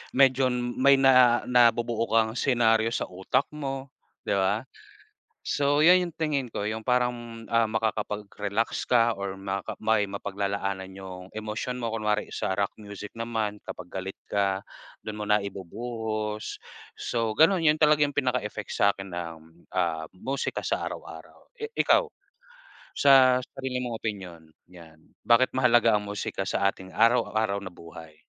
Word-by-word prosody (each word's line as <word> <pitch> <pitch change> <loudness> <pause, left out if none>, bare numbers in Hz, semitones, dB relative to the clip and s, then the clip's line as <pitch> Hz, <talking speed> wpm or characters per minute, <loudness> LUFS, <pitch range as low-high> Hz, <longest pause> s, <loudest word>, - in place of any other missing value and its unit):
medyo 130 0 +5
may 125 +3 +3
na 130 -3 +5
nabubuo 120 -2 +3
kang 110 -1 +2
senaryo 115 -4 +2
sa - - -2
utak 95 +8 0
mo, 135 -2 -5 0.3
'di - - 0
ba? 100 +4 +1 0.8
So 145 0 +1
'yan 180 +2 +7
'yung 170 - -13
tingin 145 -5 -1
ko 100 - -3
'yung 110 +1 -4
parang, 120 -2 -1
ah, 115 0 +3
makakapag-relax 105 -1 -2
ka 120 -1 +4
or 100 -1 -4
makaka 95 0 -4
may 110 -1 +2
mapaglalaanan 100 -1 -3
'yung 95 -1 -8
emosyon 110 +4 -4
mo, 115 - -2
kunwari 105 -1 -1
sa - - -2
rock 100 0 0
music 105 0 -9
naman 110 -2 -2
kapag 90 -1 -8
galit 95 +1 -5
ka, 100 -1 0 0.4
dun 110 -1 -5
mo - - -2
na 105 0 +4
ibubuhos. 110 +2 -5 0.4
So 115 -2 -1
ganun 165 - +4
yun 155 0 +3
talaga 150 -1 +5
yung 145 - -2
pinaka-effect 110 -5 -1
sa'kin 100 -1 +1
ng, 85 -2 -5 0.3
ah, 85 -3 0
musika 135 +8 -3
sa - - -2
araw-araw. - - -11
Eh, 445 -1 -6
ikaw, 480 - +3 0.9
sa 130 -2 +6
sarili 130 -1 -4
mong 120 -2 -4
opinyon 95 -6 -6 0.3
'yan, 85 -3 -14 0.3
bakit 120 +2 +5
mahalaga 120 -4 +4
ang 105 - -8
musika 100 -1 -4
sa 100 0 +2
ating 95 -1 -13
araw-araw 110 -3 +2
na 100 - -8
buhay? 80 -2 -12
110 Hz, 145 wpm, -27 LUFS, 100-125 Hz, 0.9 s, yan